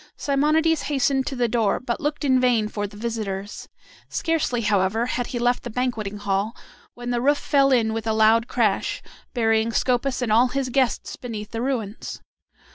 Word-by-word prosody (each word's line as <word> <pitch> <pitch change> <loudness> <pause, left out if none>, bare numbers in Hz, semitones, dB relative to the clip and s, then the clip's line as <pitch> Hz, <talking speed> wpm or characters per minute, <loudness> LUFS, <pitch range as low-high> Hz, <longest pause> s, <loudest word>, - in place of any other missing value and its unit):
Simonides 305 +3 +2
hastened 270 -2 0
to 275 - -3
the 245 -1 +1
door, 225 -3 +1
but 240 -2 -3
looked 295 0 -2
in 260 -2 +4
vain 240 -4 +2
for 205 -1 -3
the 205 +1 -13
visitors. 210 -3 -4 0.4
Scarcely, 310 -7 0
however, 210 +1 +1
had 245 -1 -2
he 245 - -4
left 245 +1 +1
the 240 - -6
banqueting 225 -4 -2
hall 205 +2 -1 0.4
when 245 0 -5
the 240 -1 0
roof 285 +3 +3
fell 275 -2 +2
in 225 -4 +3
with 225 0 -4
a 220 - +2
loud 220 +2 +4
crash, 220 -5 0 0.3
burying 225 -1 +2
Scopas 255 +2 0
and 230 - -1
all 235 +4 +5
his 260 +1 -2
guests 260 -1 0
beneath 215 -4 -7
the 230 - -3
ruins. 235 -5 -3
240 Hz, 180 wpm, -23 LUFS, 220-260 Hz, 0.4 s, all